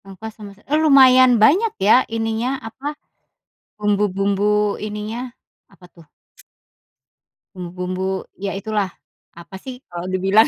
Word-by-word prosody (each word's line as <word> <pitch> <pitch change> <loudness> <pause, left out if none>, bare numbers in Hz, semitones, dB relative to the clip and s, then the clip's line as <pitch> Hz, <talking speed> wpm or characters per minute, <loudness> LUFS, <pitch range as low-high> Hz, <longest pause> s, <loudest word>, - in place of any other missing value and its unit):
Nangka 195 +3 -9
sama 205 -2 -10
s - - -32
eee, 300 +6 0
lumayan 260 -3 +7
banyak 390 - +4
ya, 220 - +7 0.2
ininya, 225 +2 -1 0.2
apa, 260 +5 -8 0.9
bumbu-bumbu 205 0 +1
ininya? 210 +3 -5 0.5
Apa 185 - -18
tuh? 170 -2 -17 1.5
Bumbu-bumbu, 185 +1 -4 0.2
ya 200 0 -3
itulah, 210 0 -1 0.5
apa 170 +3 -12
sih 260 0 -9
kalau 175 +1 -5
dibilang? 195 +4 +4
210 Hz, 115 wpm, -20 LUFS, 190-230 Hz, 1.5 s, lumayan